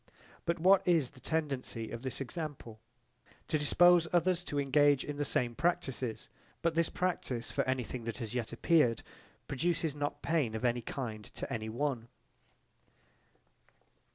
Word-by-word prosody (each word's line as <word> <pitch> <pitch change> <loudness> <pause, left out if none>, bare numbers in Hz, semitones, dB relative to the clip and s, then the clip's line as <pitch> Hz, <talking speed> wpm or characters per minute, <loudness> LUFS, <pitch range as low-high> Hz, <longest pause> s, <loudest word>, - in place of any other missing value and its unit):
But 170 - +1
what 185 +3 +6
is 165 -7 +3
the 130 - -14
tendency 135 -7 -2
of 115 - -5
this 130 -1 -4
example? 135 -5 -6 0.7
To 155 - +1
dispose 175 +3 +5
others 175 0 +2
to 145 - -2
engage 145 0 +4
in 145 -1 -5
the 145 - 0
same 125 -4 0
practises: 135 -6 -1 0.4
but 170 -1 +2
this 165 0 +2
practise 150 -10 -2
for - - +1
anything 130 -2 -2
that 115 -2 -4
has 115 -1 -5
yet 120 -3 -2
appeared 120 -2 +3 0.4
produces 160 +2 0
not 145 0 -3
pain 150 -9 +1
of 110 - -2
any 120 0 +1
kind 110 -3 -5
to - - -6
any 110 -1 -3
one. 120 -1 -2
140 Hz, 150 wpm, -32 LUFS, 120-165 Hz, 0.7 s, what